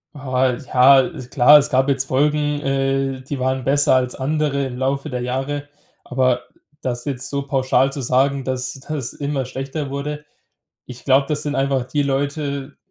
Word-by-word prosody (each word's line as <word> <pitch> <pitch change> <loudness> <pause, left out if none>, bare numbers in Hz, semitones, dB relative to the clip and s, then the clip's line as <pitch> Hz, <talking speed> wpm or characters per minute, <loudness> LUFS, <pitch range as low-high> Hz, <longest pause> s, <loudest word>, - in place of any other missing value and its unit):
Ah, 130 -2 0
ja, 130 +2 +5
ist 125 -1 -6
klar. 145 +5 +7
Es 145 - -2
gab 130 0 +2
jetzt 135 -1 +1
Folgen, 145 +2 +1
äh, 135 -1 -1
die 135 +1 -5
waren 130 0 -1
besser 140 0 +3
als 125 -1 0
andere 140 0 -1
im 130 -2 -6
Laufe 135 +3 -1
der 125 -1 -3
Jahre. 135 +3 -3 0.3
Aber 125 -1 +1 0.4
das 120 -1 -3
jetzt 135 -2 -4
so 140 -1 -2
pauschal 135 0 +2
zu 140 - -4
sagen, 135 +2 +1
dass 130 -1 -3
das 135 -2 -5
immer 140 -2 -3
schlechter 135 +3 -5
wurde. 150 +2 -5 0.6
Ich 125 -1 -11
glaube, 135 0 +4
das 150 -1 -2
sind 145 0 -2
einfach 135 -1 +1
die 145 +3 -1
Leute, 140 0 -2
135 Hz, 170 wpm, -20 LUFS, 130-145 Hz, 0.6 s, klar